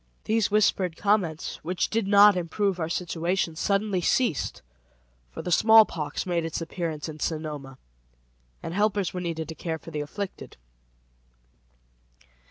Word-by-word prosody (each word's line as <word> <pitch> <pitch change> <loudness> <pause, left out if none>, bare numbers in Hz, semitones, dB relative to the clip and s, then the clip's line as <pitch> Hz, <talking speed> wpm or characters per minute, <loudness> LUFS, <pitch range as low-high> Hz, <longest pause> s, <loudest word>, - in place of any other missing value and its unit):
These 220 -1 +1
whispered 195 -4 +2
comments, 195 -7 0
which 175 +3 -2
did 220 -2 0
not 205 0 +7
improve 185 +2 -1
our 160 -1 -2
situation, 170 0 -1
suddenly 195 +2 0
ceased, 205 - 0 0.7
for - - -8
the 180 - -4
smallpox 190 -7 +4
made 175 -2 0
its 165 -1 -3
appearance 165 -2 -4
in 155 -1 -8
Sonoma, 150 -5 -4 0.9
and 165 - -5
helpers 205 -2 0
were 180 - -4
needed 165 -2 -3
to - - -4
care 160 0 -4
for - - -12
the 150 - -3
afflicted. 190 +7 -7
175 Hz, 135 wpm, -26 LUFS, 160-200 Hz, 0.9 s, not